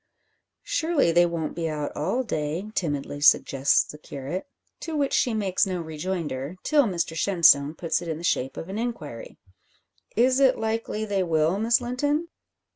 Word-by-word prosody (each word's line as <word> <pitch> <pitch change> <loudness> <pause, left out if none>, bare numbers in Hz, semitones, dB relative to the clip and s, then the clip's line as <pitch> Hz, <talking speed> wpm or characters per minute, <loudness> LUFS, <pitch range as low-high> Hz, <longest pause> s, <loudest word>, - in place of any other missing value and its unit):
"Surely, 325 - +1
they 175 +1 +4
won't 165 -2 -3
be 165 -1 -2
out 150 -1 -4
all 190 - -1
day," 165 +1 -3
timidly 145 -5 -3
suggests 140 -1 +4
the 150 - -11
curate; 145 - -6 0.3
to 325 -2 -5
which 285 -2 0
she 245 - +2
makes 200 -3 +1
no 185 -2 -2
rejoinder, 160 -2 -4
till 295 -3 +3
Mr 170 -5 -2
Shenstone 165 -5 +4
puts 165 0 -1
it 175 - -7
in 160 -2 -3
the 165 - -9
shape 135 -6 -1
of 165 - -6
an 195 +3 -4
inquiry. 155 - -6 0.8
"Is 255 +3 +3
it 265 -1 +4
likely 220 -1 -2
they 200 -2 0
will, 165 +1 +1
Miss 235 +3 +3
Linton?" 290 +7 -1
180 Hz, 165 wpm, -25 LUFS, 155-235 Hz, 0.8 s, they